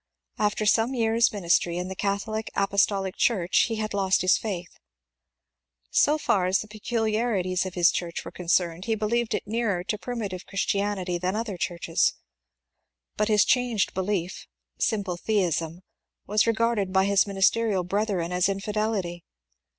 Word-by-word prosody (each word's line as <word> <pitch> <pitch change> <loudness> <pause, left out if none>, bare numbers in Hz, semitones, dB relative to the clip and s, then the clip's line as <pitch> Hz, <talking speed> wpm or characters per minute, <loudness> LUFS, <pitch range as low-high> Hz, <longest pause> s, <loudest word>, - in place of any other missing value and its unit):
After 210 0 0
some 225 +5 +2
years' 230 0 +3
ministry 175 -3 +1
in 180 +1 -3
the 190 - -6
Catholic 205 +3 -2
Apostolic 195 -1 +1
Church 185 -7 +2
he 225 - -2
had 215 -1 -3
lost 190 -2 +2
his 185 - +5
faith. 180 -5 -5 1.1
So 300 +2 +4
far 190 -11 +1
as 185 +1 +3
the 215 - -5
peculiarities 215 -4 -1
of 185 - -8
his 175 -1 +5
church 170 -1 -4
were - - -7
concerned 175 0 0
he 225 -1 0
believed 220 +2 0
it - - -4
nearer 210 -4 -1
to 210 +3 -3
primitive 205 -7 -5
Christianity 195 -2 -1
than 185 +3 -1
other 220 -3 -3
churches; 170 -1 0 1.0
but 210 - +1
his 210 -2 +4
changed 245 -5 +1
belief 190 -1 -3 0.2
— - - -63
simple 200 -5 -1
theism 175 -4 -1 0.2
— - - -61
was 210 +2 +2
regarded 230 -4 +1
by 190 0 +3
his 200 0 +3
ministerial 195 0 +2
brethren 190 -2 -1
as 180 +1 +2
infidelity. 195 -3 -2
200 Hz, 150 wpm, -26 LUFS, 180-220 Hz, 1.1 s, his